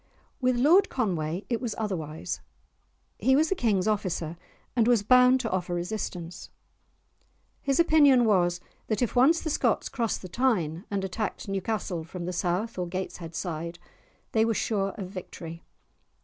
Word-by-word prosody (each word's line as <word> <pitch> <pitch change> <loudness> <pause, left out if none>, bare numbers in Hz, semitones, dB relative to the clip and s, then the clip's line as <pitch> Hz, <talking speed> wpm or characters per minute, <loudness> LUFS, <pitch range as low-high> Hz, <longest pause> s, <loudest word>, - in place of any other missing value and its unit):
With 255 -1 +3
Lord 320 +11 +5
Conway 180 - -2
it 235 -2 -1
was 235 -4 -3
otherwise; 160 - -4 0.8
he 265 +5 +4
was 310 +3 +3
the - - +3
King's 210 - +1
officer, 185 -6 -1 0.4
and 235 -2 +3
was 235 -4 +4
bound 250 +3 +6
to 225 - -2
offer 180 -1 -1
resistance. 175 -2 -5 1.1
His 275 +1 0
opinion 290 -7 +6
was 175 -4 +2 0.3
that 220 +2 0
if 240 - -2
once 285 +7 +5
the 315 - -2
Scots - - +1
crossed 230 -5 -2
the - - -6
Tyne, 180 -6 0
and 200 -1 -2
attacked 195 +4 -3
Newcastle 195 -3 -2
from 170 +2 -7
the 180 - -3
south 185 +5 -1
or 180 - -1
Gateshead 170 -2 -5
side, 170 -1 -4 0.5
they 220 - +3
were 225 0 +1
sure 200 -3 0
of 190 -3 -5
victory. 170 -3 -8
200 Hz, 155 wpm, -27 LUFS, 175-240 Hz, 1.1 s, bound